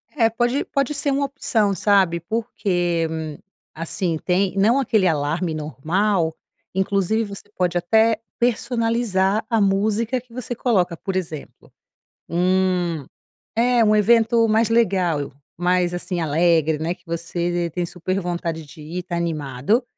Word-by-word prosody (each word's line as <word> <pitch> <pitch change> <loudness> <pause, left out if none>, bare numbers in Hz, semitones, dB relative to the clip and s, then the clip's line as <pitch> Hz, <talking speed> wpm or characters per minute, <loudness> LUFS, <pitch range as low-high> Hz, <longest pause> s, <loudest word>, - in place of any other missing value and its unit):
É, 225 -4 +4
pode 240 +4 0
pode 275 +1 -1
ser 285 0 +2
uma 280 +1 +1
opção, 225 -7 0
sabe, 190 -3 +3
porque, 175 -4 -1 0.7
assim, 165 +1 -2
tem 185 +1 +1
não 230 +7 +4
aquele 215 -7 +2
alarme 160 +2 0
normal, 160 +4 0 0.4
inclusive 195 +3 +1
você 200 0 -9
pode 180 -1 0
até 220 +5 +3 0.2
personalizar 230 -4 +1
a 225 -2 +2
música 215 +5 +1
que 240 -2 -22
você 245 -1 -5
coloca, 185 -9 +1
por 195 +3 -5
exemplo, 160 -5 -6 0.6
hum 180 -3 +1 0.5
é, 245 -1 +4
um 215 0 +4
evento 230 +2 +4
mais 220 +1 +3
legal, 180 - +1 0.2
mais, 180 0 +1
assim, 175 0 -3
alegre, 160 0 +2
né, 165 +3 -2
que 180 0 -29
você 170 +1 -2
t - - -13
tem 175 -1 -1
super 185 +3 -3
vontade 170 -2 -3
de 150 +2 -14
ir, 170 +4 -5
tá 175 -1 -4
animado. 160 - 0
185 Hz, 140 wpm, -22 LUFS, 170-225 Hz, 0.7 s, É